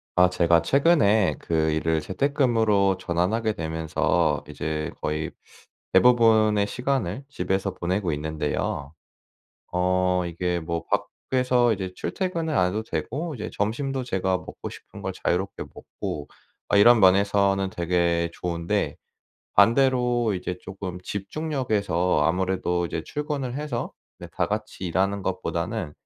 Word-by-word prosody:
아 90 0 +6
제가 85 -2 +3
최근에 135 - +3
그 80 -1 0
일을 80 0 0
재택근무로 110 - +2
전환하게 105 +7 0
되면서 80 -4 0
이제 75 +1 -3
거의 75 +1 -2 0.6
대부분의 110 -1 +5
시간을 125 -1 -2
집에서 95 -8 -1
보내고 90 0 -1
있는데요. 75 -1 -3 0.8
어 90 0 +2
이게 85 +1 -2
뭐 85 0 -3 0.4
밖에서 125 -2 +3
이제 95 -3 -4
출퇴근을 170 -4 -2
안 90 - +4
해도 105 +4 -3
되고 140 - -3
이제 110 - -5
점심도 130 +6 -1
제가 95 -4 0
먹고 - - -8
싶은 - - -12
걸 - - -3
자유롭게 95 +3 -1
먹고 75 -1 -6 0.4
아 100 - +4
이런 120 +3 +7
면에서는 100 0 +4
되게 85 -1 +1
좋은데 90 +4 -2 0.6
반대로 120 +1 +4
이제 90 0 -4
조금 95 -1 -6
집중력에서 100 - -1
아무래도 90 0 0
이제 80 - -4
출근을 145 -4 -3
해서 145 -5 -3 0.3
네 - - -8
다 - - 0
같이 - - -4
일하는 95 +4 0
것보다는 90 -1 -3
95 Hz, 285 characters per minute, -25 LUFS, 85-120 Hz, 0.8 s, 이런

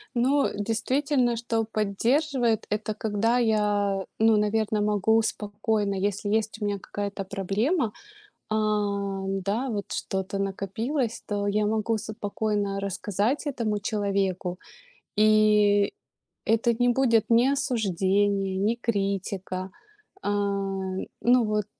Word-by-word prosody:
Но 270 +4 +3
действительно, 240 +4 +1
что 230 -1 -1
поддерживает 235 +3 +1
это 215 0 -2
когда 220 +3 0
я, 205 -4 +1
ну, 220 -1 +5
наверно, 210 0 +1
могу 210 +2 +3
спокойно, 210 -1 -1
если 205 +1 -1
есть 220 0 -1
у - - 0
меня 200 -1 -1
какая-то 200 +1 -4
проблема, 210 - 0 0.6
э, - - +2
да, 200 +1 -1
вот 205 -3 -4
что-то 195 0 -3
накопилось, 220 +6 -2
то 205 -1 -1
я 210 +1 +1
могу 220 +1 0
спокойно 205 -2 -2
рассказать 205 - -1
этому 220 -6 -1
человеку. 195 -4 -1 0.6
И 210 -1 +4 0.5
это 230 +1 +3
не 245 +2 +2
будет 235 -3 +3
ни 235 +3 +5
осуждение, 200 - +1
ни 210 +4 +1
критика. 195 -4 -2 0.5
А, - - -1 0.9
ну 245 0 +4
вот, 210 -1 0
210 Hz, 110 wpm, -26 LUFS, 200-225 Hz, 0.9 s, ну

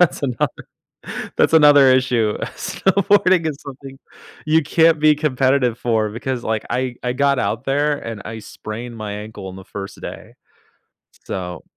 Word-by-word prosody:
that's 150 -5 +2
another 125 -4 0 0.9
that's - - +3
another 145 -3 +7
issue, 120 -4 +1 0.2
snowboarding 190 -3 +2
is 145 - -4
something 135 0 -10 0.5
you 160 +1 +4
can't 160 +1 +3
be 155 0 +5
competitive 130 -4 +1
for 110 -3 0
because, 120 +2 -4
like, 110 -1 -1
I 125 -1 -2
I 125 0 -1
got 140 0 +2
out 110 +4 -2
there 145 +2 +1
and 115 -3 -7
I 110 0 -7
sprained 115 +3 -8
my 105 -1 -5
ankle 105 -1 -8
on 95 - -9
the 95 - -11
first 100 -1 -8
day. - - -9 0.9
So 90 -3 -5
130 Hz, 155 wpm, -20 LUFS, 110-145 Hz, 0.9 s, another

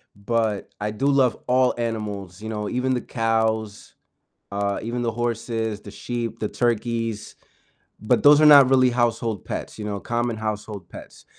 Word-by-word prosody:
but 110 0 -1
I 105 - -1
do 110 +6 -3
love 135 -4 +3
all 130 0 +3
animals, 105 -5 -4
you 110 - -6
know, 105 -1 -3
even 130 +1 0
the 125 - -2
cows, 110 -2 -1 0.6
uh, 100 0 -1
even 120 +2 -3
the 115 - 0
horses, 115 -2 -2
the 100 - -10
sheep, 120 +1 -5
the 105 - -2
turkeys, 115 -2 -2 0.6
but 110 +3 +1
those 145 0 +8
are 155 - +5
not 140 -3 +9
really 130 -1 +4
household 115 -3 0
pets, - - -6
you 110 - -6
know? 105 -1 -3
Common 120 0 -2
household 105 -4 -5
pets, - - -12
115 Hz, 165 wpm, -23 LUFS, 105-120 Hz, 0.6 s, not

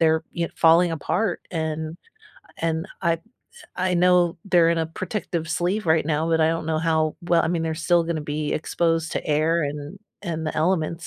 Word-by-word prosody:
they're 160 0 +3
y 170 -1 0
falling 165 +1 +5
apart, 175 +5 -1
and 160 0 -3 0.6
and 165 +2 -1
I 165 -2 +1 0.6
I 185 0 0
know 175 -1 +3
they're 170 -4 +4
in 170 - +1
a 160 - 0
protective 170 -1 -4
sleeve 180 +4 -1
right 160 -1 +3
now, 160 +1 0
but 160 -1 +2
I 160 - +4
don't 165 -1 -2
know 160 -1 0
how 160 -1 +1
well, 170 -1 +3
I - - 0
mean, 170 -1 0
they're 160 -1 -1
still 170 +1 +2
gonna 165 -2 -2
be 150 0 -2
exposed 165 0 0
to - - -3
air 155 +2 +2
and 145 0 -6 0.2
and 160 -3 -3
the 155 - -3
elements, 170 -1 0
165 Hz, 190 wpm, -24 LUFS, 160-170 Hz, 0.6 s, falling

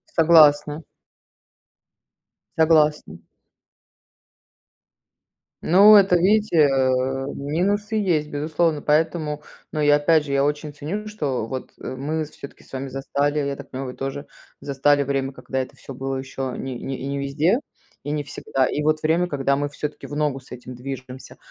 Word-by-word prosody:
Согласна. 155 -2 +5 1.7
Согласна. 155 - +3 2.5
Ну, 200 +5 +8
это 195 -3 +6
видите, 205 +1 +2
э, 130 0 +1
минусы 200 +9 -1
есть, 175 -8 +1
безусловно. 155 +1 -1
Поэтому 150 0 0 0.3
но 155 - -2
я 145 0 +5
опять 150 +1 +3
же, 140 - -4
я 140 0 +3
очень 150 +1 -2
ценю, 175 +9 -5
что 140 - -3
вот, 130 +2 -6
э, - - -5
мы 155 +4 -2
всё-таки 140 -1 -12
с - - -22
вами 135 +1 -4
застали, 140 +2 -1
я 140 -1 -2
так 140 0 -11
понимаю, 130 0 -5
вы - - -19
тоже, 135 +2 -5 0.3
застали 140 +1 +2
время, 135 -1 -1
когда 130 -1 -5
это 130 - -8
всё 135 - -10
было 135 +1 -4
ещё 130 -1 -5
ни 135 - -5
ни 130 +2 -5
не 140 +1 -3
везде 150 - +1 0.4
и 145 - -4
не 150 -1 -2
всегда, 135 -1 -1
и 150 - -2
вот 155 0 +1
время, 165 +3 +2
когда 140 -3 0
мы 145 +1 -2
всё-таки 150 +1 -6
в 145 - -6
ногу 145 -3 -1
с 130 - -21
этим 125 0 -9
движемся. 130 0 -8
145 Hz, 155 wpm, -22 LUFS, 135-155 Hz, 2.5 s, Ну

